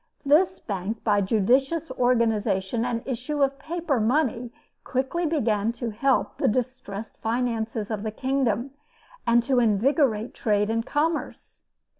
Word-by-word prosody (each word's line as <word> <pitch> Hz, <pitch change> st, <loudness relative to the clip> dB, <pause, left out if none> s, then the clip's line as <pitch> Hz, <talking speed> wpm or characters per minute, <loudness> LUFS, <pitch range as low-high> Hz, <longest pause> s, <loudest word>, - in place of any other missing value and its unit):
This 350 Hz, +6 st, +4 dB
bank, 200 Hz, +2 st, -4 dB
by 205 Hz, -2 st, +3 dB
a -, -, +1 dB
judicious 260 Hz, -, +1 dB
organization 225 Hz, -4 st, +1 dB
and 235 Hz, -2 st, -2 dB
issue 275 Hz, +3 st, -1 dB
of 275 Hz, 0 st, 0 dB
paper 320 Hz, -3 st, -1 dB
money, 240 Hz, 0 st, 0 dB, 0.3 s
quickly 265 Hz, +7 st, -1 dB
began 225 Hz, -8 st, +1 dB
to 235 Hz, -1 st, -4 dB
help 260 Hz, +5 st, 0 dB
the -, -, +2 dB
distressed 230 Hz, -3 st, -3 dB
finances 225 Hz, -2 st, -2 dB
of 215 Hz, -2 st, -2 dB
the 220 Hz, -, -2 dB
kingdom, 260 Hz, 0 st, -1 dB, 0.6 s
and 235 Hz, 0 st, +4 dB
to 260 Hz, 0 st, +2 dB
invigorate 230 Hz, -, +2 dB
trade 210 Hz, -1 st, +1 dB
and 230 Hz, 0 st, 0 dB
commerce. 310 Hz, +5 st, -3 dB
240 Hz, 135 wpm, -25 LUFS, 220-275 Hz, 0.6 s, This